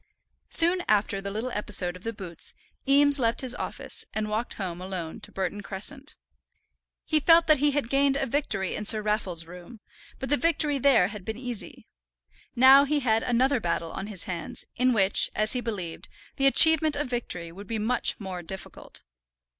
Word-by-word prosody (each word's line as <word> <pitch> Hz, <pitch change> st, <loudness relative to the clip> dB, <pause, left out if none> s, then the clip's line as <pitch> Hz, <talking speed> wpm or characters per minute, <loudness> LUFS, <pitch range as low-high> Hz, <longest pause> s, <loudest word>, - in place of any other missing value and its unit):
Soon 345 Hz, +2 st, +3 dB
after 200 Hz, -2 st, +1 dB
the 200 Hz, -, -6 dB
little 220 Hz, +5 st, -4 dB
episode 195 Hz, -4 st, 0 dB
of 180 Hz, -, -12 dB
the 230 Hz, -, -3 dB
boots 185 Hz, -6 st, -3 dB, 0.3 s
Eames 285 Hz, +1 st, +5 dB
left 230 Hz, -2 st, 0 dB
his 255 Hz, -2 st, 0 dB
office, -, -, -5 dB
and 215 Hz, 0 st, -3 dB
walked 225 Hz, +3 st, -2 dB
home 180 Hz, -3 st, -6 dB
alone 180 Hz, -4 st, -6 dB
to -, -, -12 dB
Burton 195 Hz, +2 st, -4 dB
Crescent. 260 Hz, +9 st, -6 dB, 0.9 s
He 310 Hz, -, +1 dB
felt 330 Hz, +2 st, +5 dB
that 310 Hz, -3 st, +3 dB
he 295 Hz, +1 st, +3 dB
had 285 Hz, -3 st, -2 dB
gained 275 Hz, +1 st, +1 dB
a 275 Hz, -, -1 dB
victory 225 Hz, -8 st, -2 dB
in -, -, -4 dB
Sir 215 Hz, 0 st, +7 dB
Raffle's 200 Hz, -6 st, -2 dB
room, 180 Hz, +6 st, -13 dB, 0.4 s
but 265 Hz, -, -6 dB
the 290 Hz, -, +3 dB
victory 300 Hz, -3 st, 0 dB
there 245 Hz, -9 st, +3 dB
had 210 Hz, -2 st, -9 dB
been 220 Hz, +3 st, -6 dB
easy. 245 Hz, -3 st, -7 dB, 0.7 s
Now 265 Hz, +3 st, +7 dB
he 290 Hz, +1 st, -1 dB
had 225 Hz, -3 st, +1 dB
another 250 Hz, +3 st, +1 dB
battle 170 Hz, -3 st, -3 dB
on 195 Hz, -, -6 dB
his 200 Hz, -4 st, -5 dB
hands, 170 Hz, -3 st, -5 dB
in 255 Hz, +1 st, +2 dB
which, 200 Hz, -4 st, +2 dB
as 215 Hz, +1 st, +2 dB
he 250 Hz, -, -2 dB
believed, 190 Hz, -8 st, -6 dB, 0.3 s
the 275 Hz, -1 st, +3 dB
achievement 315 Hz, +1 st, +6 dB
of 295 Hz, +1 st, -2 dB
victory 205 Hz, -9 st, -4 dB
would 195 Hz, +4 st, -12 dB
be 225 Hz, -, -3 dB
much 220 Hz, +4 st, 0 dB
more 190 Hz, -3 st, -6 dB
difficult. 190 Hz, +3 st, -9 dB
225 Hz, 185 wpm, -26 LUFS, 190-275 Hz, 0.9 s, Sir